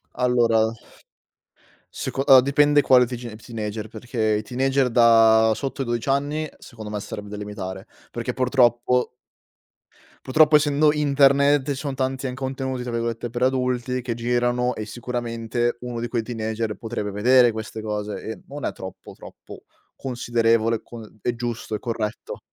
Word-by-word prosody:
Allora 115 -3 +2 1.2
seco 135 - -3
allora, 135 -2 +8
dipende 145 +2 +4
quale 125 -2 +5
teeg 120 -2 -7
teenager, 110 -2 -5
perché 110 -1 -1
i - - -2
teenager 130 +3 0
da 115 -1 +5
sotto 135 +3 -4
i - - -7
12 120 +2 -2
anni 145 +3 0
secondo 110 -4 -10
me 105 -1 -3
sarebbe 105 0 -7
da 105 - -6
limitare, 100 -1 -6 0.2
perché 120 +1 -4
purtroppo 125 -1 +2 1.1
purtroppo 155 +3 +5
essendo 150 0 +4
internet 140 -1 +3
ci - - -1
sono 140 0 -4
tanti 130 0 -2
an 125 - -4
"contenuti" 130 -1 -4
tra 120 - -5
virgolette 115 0 -2
per 120 +1 -5
adulti 125 -1 0
che 120 -1 -3
girano 120 +1 0
e 110 - -6
sicuramente 120 0 -3
uno 120 -1 -5
di 120 - -3
quei 115 -1 -2
teenager 110 -1 -3
potrebbe 110 -3 -4
vedere 120 +4 +4
queste 110 0 -6
cose, 105 -1 -4
ehm, 110 - -7
non 145 -1 -8
è - - -1
troppo 95 - -10
troppo - - -13 0.3
considerevole 115 -3 +1
con 110 -2 -12
è 120 - -1
giusto, 115 -2 -4
è - - -4
corretto. 115 -3 -4
120 Hz, 150 wpm, -23 LUFS, 110-130 Hz, 1.2 s, allora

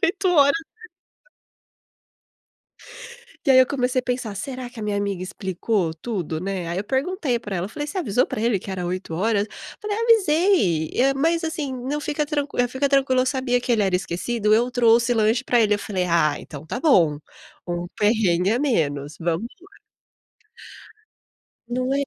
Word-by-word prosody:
8 380 +1 +1
horas". 285 -3 +5 2.9
E - - +4
aí 260 - +7
eu 260 - +7
comecei 255 -1 0
a - - -21
pensar: 245 -4 -3
"Será 255 +5 -6
que 245 -2 -11
a - - -5
minha 210 -1 -1
amiga 200 -2 -2
explicou 190 -1 -2
tudo, 165 -4 -4
né", 190 -1 -3
aí 170 - -3
eu 200 - -3
perguntei 270 - -1
pra 205 -4 -5
ela, 175 +3 -3
falei: 295 +7 -5
"Você 300 - -7
avisou 250 - +1
pra - - -4
ele 225 -2 +2
que 195 - -9
era 185 -2 -3
8 180 -1 -4
horas?". 205 +3 +1 0.3
Falei: 420 -1 -3
"Avisei, 355 - +3
eh, 270 +2 +3
mas, 330 +5 +1
assim, 315 -4 -3
não, 260 +4 -3
fica 300 0 -2
tranqu 290 -1 -3
fica 265 +3 -1
tranquila, 270 -2 +3
eu 255 - -3
sabia 260 -2 0
que 245 - -5
ele 220 -3 +2
era 190 -2 +1
esquecido, 210 +5 -1
eu 240 +3 +2
trouxe 235 0 +3
lanche 225 +3 +2
pra 245 -2 +3
ele". 210 -2 +3
Eu - - -2
falei: 190 -3 -2
"Ah, 165 -4 +2
então 150 0 -10
tá 240 - -4
bom, 170 - +4 0.5
um 175 0 -3
perrengue 200 -4 +2
a 230 - +2
menos, 150 - -1
vamos 170 +5 -1
lá". 390 +3 -19 1.9
Não 255 +2 -1
é 280 - +1
235 Hz, 175 wpm, -23 LUFS, 190-275 Hz, 2.9 s, aí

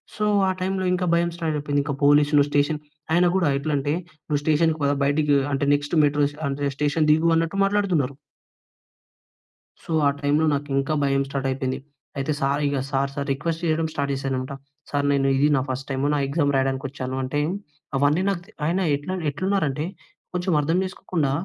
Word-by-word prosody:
So 210 - -1 0.2
ఆ - - +2
టైంలో 190 0 -1
ఇంకా 180 0 0
భయం 170 0 +2
స్టార్ట్ 165 -3 -2
అయిపోయింది. 145 -1 0
ఇంకా 145 - -2
పోలీస్‌లు, 145 0 +5
స్టేషన్. 145 +1 +1 0.3
ఆయన 175 +1 +4
కూడా 185 -4 +2
ఎట్లంటే, 145 0 -1 0.3
నువ్వు 145 -2 0
స్టేషన్‌కి 155 +1 +2
పదా! 140 0 +2
బయటికి 145 +1 +2 0.2
అంటే, 140 +1 0
నెక్స్ట్ 145 +3 -3
మెట్రో 145 0 +3 0.2
అంటే, 140 +1 -1
స్టేషన్ 150 +2 +1
దిగు 160 +2 +3
అన్నట్టు 165 +4 0
మాట్లాడుతున్నారు. 185 -10 +1 1.7
సో - - -8 0.2
ఆ - - +5
టైమ్‌లో 145 +2 +2
నాకు 145 0 -2
ఇంకా 140 +3 -1
భయం 135 0 +2
స్టార్ట్ 135 -1 -2
అయిపోయింది. 130 0 -2 0.4
అయితే 135 +2 -1
సార్ 140 +1 +1
ఇక 140 0 0
సార్, 135 0 +1
సార్ 140 -1 -3
రిక్వెస్ట్ 165 +4 -3
చేయడం 160 0 +1
స్టార్ట్ 140 -1 -1
చేశానన్నమాట. 135 0 -3 0.4
సార్ 145 0 0
నేను 140 -1 +2
ఇది 145 +2 +4
నా 135 - +2
ఫస్ట్ 130 +1 -4
టైమ్ 135 0 -2
నా - - +1
ఎగ్జామ్ 145 0 +1
రాయడానికి 135 0 0
వచ్చానంటే, 130 +1 -3 0.6
అవన్నీ 145 +5 +3
నాకు 190 -3 -1
తే 220 - -19
ఆయన 170 +4 +1 0.2
ఎట్ల 145 +6 -6 0.2
ఎట్లున్నారంటే 155 -2 -1 0.5
కొంచెం 180 +1 -1
అర్థం 160 +4 +1
చేసుకోకుండా, 175 -6 -2
145 Hz, 170 wpm, -24 LUFS, 140-165 Hz, 1.7 s, పోలీస్‌లు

